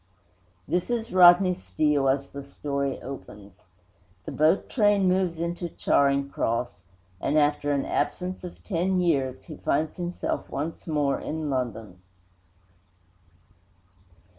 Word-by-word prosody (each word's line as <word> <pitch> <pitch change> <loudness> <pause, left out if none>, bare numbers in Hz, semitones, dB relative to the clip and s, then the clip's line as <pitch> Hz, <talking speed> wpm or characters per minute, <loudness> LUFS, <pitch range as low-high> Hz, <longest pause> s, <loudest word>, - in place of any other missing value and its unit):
This 180 +4 -1
is 230 -2 -2
Rodney 180 0 +7
Steele 140 - +1
as 140 +1 0
the 140 - -7
story 140 0 -3
opens. 105 -6 -10 0.6
The - - -5
boat 155 +5 +2
train 205 -5 +3
moves 180 -3 +1
into 170 +1 -3
Charing 140 -2 +2
Cross, 115 -8 -2 0.4
and, 150 - +1
after 145 -1 +2
an 140 -1 0
absence 180 +6 -2
of 180 - -9
ten 185 0 0
years, 135 -7 0
he 155 -4 -10
finds 155 +4 -1
himself 175 0 -3
once 155 +6 -5
more 145 -3 0
in 155 -2 -4
London. 115 -8 -4
150 Hz, 120 wpm, -26 LUFS, 135-175 Hz, 0.6 s, Rodney